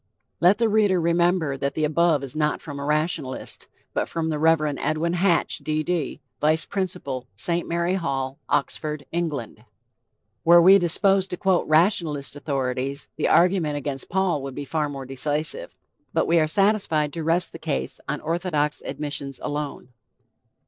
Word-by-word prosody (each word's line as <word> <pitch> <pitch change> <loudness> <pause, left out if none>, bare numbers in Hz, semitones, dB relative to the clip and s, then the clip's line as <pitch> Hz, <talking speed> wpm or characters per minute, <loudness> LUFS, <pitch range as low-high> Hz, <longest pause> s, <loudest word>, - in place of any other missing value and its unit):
Let 180 +4 +5
the 230 0 +2
reader 205 -4 +3
remember 170 -3 +1
that 140 +1 -2
the 155 - -1
above 155 -1 +2
is 135 +2 -5
not 150 -1 0
from 145 -3 -8
a - - -4
rationalist, 150 -3 -2 0.3
but - - -1
from 160 -1 -2
the 150 - -2
Rev. 160 0 +4 0.2
Edwin 155 +3 0
Hatch, 175 -1 +1
D. 155 0 -1
D., 170 -4 -2 0.2
Vice 155 +2 +2
Principal, 180 -10 -4
St. 170 - -1
Mary 170 +1 0
Hall, 135 -7 -2
Oxford, 150 -2 -1
England. 155 -9 -3 0.8
Were 170 +1 +7
we 190 +3 +7
disposed 195 +2 +3
to 180 - -3
quote 190 -1 +1
rationalist 155 -4 +2
authorities, 135 -1 -3
the - - 0
argument 170 -4 +3
against 140 -2 -3
Paul 190 -5 +1
would 135 -1 -6
be 145 - -5
far 150 0 -1
more 135 -2 -6
decisive. 150 - -2 0.4
But - - +3
we 170 0 +3
are 155 - +2
satisfied 180 -6 +2
to 165 - -4
rest 165 +2 +2
the 165 - -10
case 145 -4 -3
on 150 - -2
orthodox 160 -2 -1
admissions 140 -2 -4
alone. 145 -3 -4
155 Hz, 160 wpm, -24 LUFS, 145-175 Hz, 0.8 s, Were